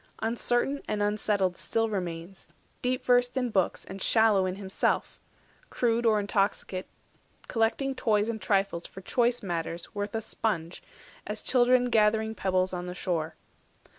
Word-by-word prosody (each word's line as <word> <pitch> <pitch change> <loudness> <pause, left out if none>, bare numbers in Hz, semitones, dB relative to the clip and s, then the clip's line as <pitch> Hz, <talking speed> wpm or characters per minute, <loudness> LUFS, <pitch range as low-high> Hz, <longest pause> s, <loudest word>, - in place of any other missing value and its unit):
Uncertain 240 +4 0
and 210 -1 0
unsettled 205 -3 +1
still 225 0 0
remains, 180 -2 -5 0.3
Deep 255 +1 -1
versed 245 +1 +3
in 250 -2 0
books 190 -4 0
and 195 +1 -8
shallow 215 -4 +4
in 185 - -3
himself, 195 -1 -1 0.5
Crude 235 -1 +1
or 215 -1 +4
intoxicate, 200 -2 -1 0.6
collecting 230 +4 +1
toys 215 -4 +1
And 225 -2 -3
trifles 195 -3 0
for 190 - -11
choice 240 +4 +1
matters, 170 -2 -4
worth 205 +1 -3
a 225 - -1
sponge, 175 -7 -3 0.5
As 210 +1 -4
children 250 -1 +3
gathering 220 0 +3
pebbles 185 -2 0
on 180 0 -4
the 180 - -5
shore. 165 -4 -2
210 Hz, 140 wpm, -28 LUFS, 185-230 Hz, 0.6 s, shallow